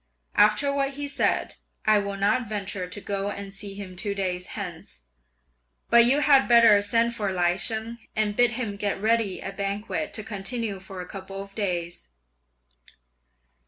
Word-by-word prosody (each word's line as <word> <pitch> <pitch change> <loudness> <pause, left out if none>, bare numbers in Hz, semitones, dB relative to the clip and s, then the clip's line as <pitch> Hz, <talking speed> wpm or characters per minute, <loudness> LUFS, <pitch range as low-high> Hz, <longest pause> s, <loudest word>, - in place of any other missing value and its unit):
After 215 +7 +4
what 275 0 -1
he 290 0 -4
said, 280 - 0 0.3
I 215 -1 +5
will 200 -1 -4
not 210 +4 +1
venture 200 -3 -4
to 180 - -4
go 200 0 -2
and 200 -1 -7
see 195 0 -5
him 195 -2 -8
two 200 +2 -2
days 180 -2 -2
hence; 175 - -7 0.9
but 235 0 +8
you 275 +5 +4
had 275 -3 +5
better 230 -4 +7
send 230 +3 +2
for 205 -4 -2
Lai 175 -1 +2
Sheng, 220 +4 -2 0.2
and 215 -1 0
bid 240 +1 +4
him 225 -4 -3
get 205 -1 -2
ready 220 -2 +1
a - - -5
banquet 200 +2 -3
to 215 - -3
continue 210 0 -2
for 190 0 -8
a 180 - -8
couple 195 0 -8
of 195 0 -8
days." 175 - -3
205 Hz, 165 wpm, -25 LUFS, 195-230 Hz, 0.9 s, but